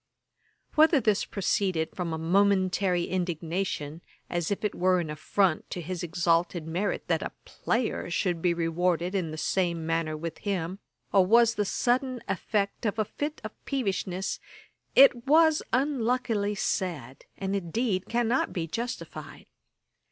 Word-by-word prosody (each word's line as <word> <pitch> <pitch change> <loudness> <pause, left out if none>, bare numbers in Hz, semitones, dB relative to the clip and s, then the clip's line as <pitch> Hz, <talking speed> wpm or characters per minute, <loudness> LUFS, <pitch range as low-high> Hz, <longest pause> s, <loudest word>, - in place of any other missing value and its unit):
Whether 315 -1 +5
this 215 -4 +1
proceeded 185 -4 -1
from 175 -3 -3
a 160 - -2
momentary 185 +1 +2
indignation, 170 -3 -3 0.3
as 175 -2 -1
if 200 +1 -2
it 210 - 0
were 185 0 +2
an 160 -3 -3
affront 155 +3 0
to - - -4
his 175 +1 -4
exalted 170 -1 +1
merit 180 +5 -2
that - - +1
a - - -4
player 230 -6 -2
should 175 -1 0
be 175 - +3
rewarded 170 +2 0
in 185 -5 -1
the 155 - -6
same 170 0 0
manner 165 -1 -1
with 165 +1 -6
him, 190 -2 -3 0.3
or 195 -2 +6
was 230 +4 +5
the 210 -2 -1
sudden 255 +4 0
effect 200 +2 -1
of 210 - -2
a 215 - +1
fit 295 +7 -5
of 215 - -5
peevishness, 195 -7 -2 0.6
it 255 -3 +6
was 315 +1 +5
unluckily 245 -5 0
said, 170 - -3
and, 195 0 -2
indeed, 195 +1 -1
cannot 240 +1 +1
be 170 -3 -2
justified. 235 +9 -6
190 Hz, 145 wpm, -28 LUFS, 170-220 Hz, 0.6 s, or